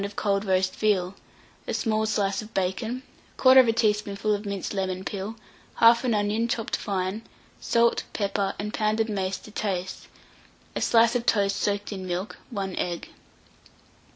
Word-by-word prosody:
of 200 +1 -5
cold 200 0 0
roast 185 -1 +1
veal, 195 -4 +1 0.5
a - - -1
small 220 -1 0
slice 200 -2 0
of 215 +1 -11
bacon, 220 +7 -1 0.3
1/4 260 -2 +7
teaspoonful 210 -2 +1
of 205 0 -3
minced 200 -1 -3
lemon 190 -1 -2
peel, 205 +2 -4 0.4
1/2 235 0 +5
onion 210 +3 +1
chopped 230 -1 -1
fine, 195 0 -2 0.4
salt, 235 0 +2
pepper, 200 -1 -1
and 210 +1 -4
pounded 215 +1 +1
mace 195 -2 -1
to 215 - -13
taste, 190 -3 -3 0.7
a - - -2
slice 230 +1 +4
of 240 -1 -1
toast 200 -2 +3
soaked 205 0 -1
in 190 -2 -5
milk, 180 +3 -3
1 195 -6 -4
egg. 175 -1 -3
205 Hz, 150 wpm, -26 LUFS, 195-225 Hz, 0.7 s, 1/4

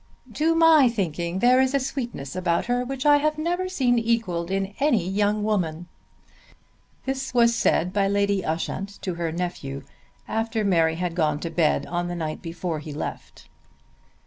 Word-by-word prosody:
"To 325 +2 +2
my 325 -5 +6
thinking 175 -5 -2
there 250 +5 +5
is 265 +1 +1
a - - +4
sweetness 240 - -5
about 175 -2 0
her 245 +1 0
which 265 +2 -5
I 290 0 +7
have 305 +1 0
never 350 +4 -1
seen 250 -9 +2
equalled 225 -7 -1
in 195 +1 -2
any 240 - +2
young 205 +2 +1
woman." 175 -6 -1 1.2
This 270 -1 -3
was 235 -1 +5
said 180 -3 +1
by 200 -1 +2
Lady 200 -1 +1
Ushant 190 +5 -3
to 185 - -2
her 170 -1 -3
nephew 160 -6 -4 0.4
after 225 -1 -1
Mary 165 -4 +3
had 175 0 -2
gone 155 -4 0
to 170 - -4
bed 155 -4 +1
on 175 +2 -2
the 175 - -4
night 155 -2 -4
before 165 -1 -4
he 150 0 -8
left. 145 - -7
195 Hz, 170 wpm, -24 LUFS, 170-245 Hz, 1.2 s, I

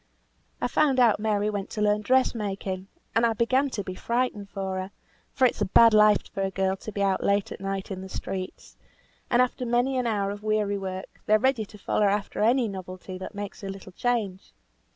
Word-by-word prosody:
I - - 0
found 275 0 +2
out 235 -5 +5
Mary 210 -1 +1
went 200 -1 -4
to 210 - -4
learn 210 0 +2
dress 260 +4 +3
making, 195 -3 -4 0.3
and 225 - +2
I 230 -1 +3
began 255 +5 +2
to 205 -5 -4
be 185 - -5
frightened 235 -1 -2
for 190 -2 -3
her; 185 +1 -5 0.4
for 265 - +3
it's 250 - +1
a - - +3
bad 230 +4 +6
life 210 -1 +5
for 195 - -3
a 195 - +1
girl 190 0 0
to 215 - -8
be 200 -1 -1
out 195 -1 +1
late 200 0 +1
at - - -7
night 195 0 -3
in 185 -1 -4
the 190 - -8
streets, 185 0 -6 0.5
and 245 0 +5
after 250 0 -3
many 245 +2 +1
an 245 - 0
hour 200 -3 0
of 205 0 -7
weary 210 -2 0
work, 190 -1 -7
they're 215 - +6
ready 245 -1 +1
to 210 - -14
follow 205 +1 +1
after 200 0 -1
any 240 +2 +3
novelty 185 -1 -7
that 190 - -7
makes 205 -1 -6
a 195 - -5
little 195 -1 -8
change. 210 -3 -2
205 Hz, 215 wpm, -26 LUFS, 195-235 Hz, 0.5 s, bad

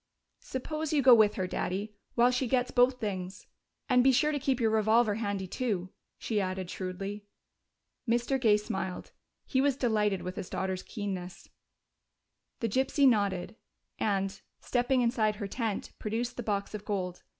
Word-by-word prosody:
"Suppose 305 +4 -4
you 295 -3 +2
go 255 -1 +9
with 215 -3 +5
her, 190 - -1
Daddy, 195 +3 -3 0.2
while 245 +1 +5
she 250 +1 0
gets 250 0 +1
both 250 +1 +4
things. 190 -2 -4 0.4
And 250 -2 +4
be 265 - +6
sure 300 +4 +3
to 290 - -1
keep 265 -1 0
your 225 -2 +2
revolver 220 0 +3
handy, 205 -3 -2
too," 185 -3 -2 0.3
she 215 -3 -1
added 185 -1 -3
shrewdly. 195 +2 -5 0.8
Mr. 240 +3 +1
Gay 215 -4 +5
smiled: 190 -3 -4 0.3
he 260 - +1
was 275 -1 +2
delighted 210 -6 +1
with 180 +1 -5
his 185 - -5
daughter's 190 -1 -2
keenness. 185 -4 -6 1.1
The 230 - +1
gypsy 265 +5 +3
nodded 200 -4 +1 0.4
and, 195 -1 -1 0.2
stepping 250 +1 +1
inside 230 -3 +1
her 205 -1 -5
tent, 220 -1 -3
produced 235 +3 -2
the - - -4
box 205 -3 -2
of 210 -1 -5
gold. 185 -4 -3
215 Hz, 160 wpm, -30 LUFS, 195-245 Hz, 1.1 s, go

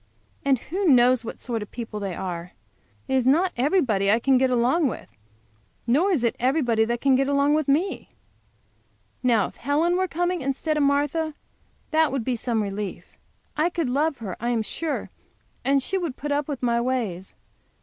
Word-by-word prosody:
And 275 -2 +3
who 370 - -3
knows 250 -3 +5
what 230 - -7
sort 235 -3 -2
of 210 - -7
people 230 -3 -6
they 195 -3 -4
are? 180 -2 -5 0.5
It - - -2
is 260 -1 +2
not 345 +7 +3
everybody 245 - +2
I 220 - +4
can 265 +1 +3
get 260 0 +3
along 255 +6 +2
with, 245 - -6 0.8
nor 290 +12 +3
is 320 -11 +1
it 235 - +1
everybody 245 -4 +2
can 270 +2 +2
get 270 +1 +2
along 280 +1 +2
with 305 -1 +1
me. 325 +8 0 1.1
Now, 230 -6 +3
if - - -10
Helen 310 +6 +1
were 375 0 +1
coming 350 0 -1
instead 275 +4 -1
of 300 - +1
Martha, 290 +2 +1 0.6
that 315 -2 +3
would 270 -3 -2
be 255 - 0
some 230 -1 -1
relief. 200 0 -6 0.4
I 310 +3 +2
could 335 -6 -2
love 290 +2 +1
her, 200 -6 -6
I 235 - -2
am 230 -2 0
sure, 320 +7 -3 0.5
and 275 0 +2
she 385 +6 -1
would 330 -8 -4
put 295 +1 -4
up 285 0 0
with 280 -4 -5
my 235 -1 +2
ways. 225 -8 -3
265 Hz, 185 wpm, -24 LUFS, 235-305 Hz, 1.1 s, knows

